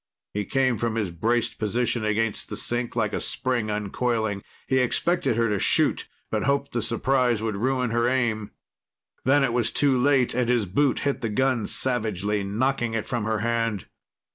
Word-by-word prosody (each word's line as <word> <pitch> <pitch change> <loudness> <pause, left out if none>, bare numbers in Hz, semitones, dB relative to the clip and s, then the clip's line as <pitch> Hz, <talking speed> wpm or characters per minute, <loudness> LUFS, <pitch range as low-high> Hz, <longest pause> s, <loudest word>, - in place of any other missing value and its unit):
He 105 0 -2
came 130 -1 +1
from 115 -1 -1
his 105 -6 -1
braced 115 +7 0
position 115 +2 0
against 110 0 -1
the - - -4
sink 120 0 -2
like - - 0
a - - -1
spring 120 -4 -1
uncoiling. 105 0 -1 0.2
He 130 - +2
expected 130 +3 +1
her 115 0 +2
to 105 -2 0
shoot, - - +2 0.2
but 110 - 0
hoped 140 0 0
the 120 - -1
surprise 120 0 +1
would 110 -3 -2
ruin 125 +1 0
her 120 +1 +2
aim. 115 -5 0 0.8
Then 140 +2 +4
it 125 -3 +1
was 120 -2 +1
too 140 -2 +3
late, 130 0 +3
and 125 -1 0
his 120 -4 +2
boot 130 +9 +1
hit 140 -1 -1
the 115 - -1
gun 125 0 +1
savagely, 105 -5 -1
knocking 120 +3 0
it 110 - -2
from 120 -3 -2
her 110 -1 -1
hand. 115 -3 -1
115 Hz, 180 wpm, -25 LUFS, 110-130 Hz, 0.8 s, Then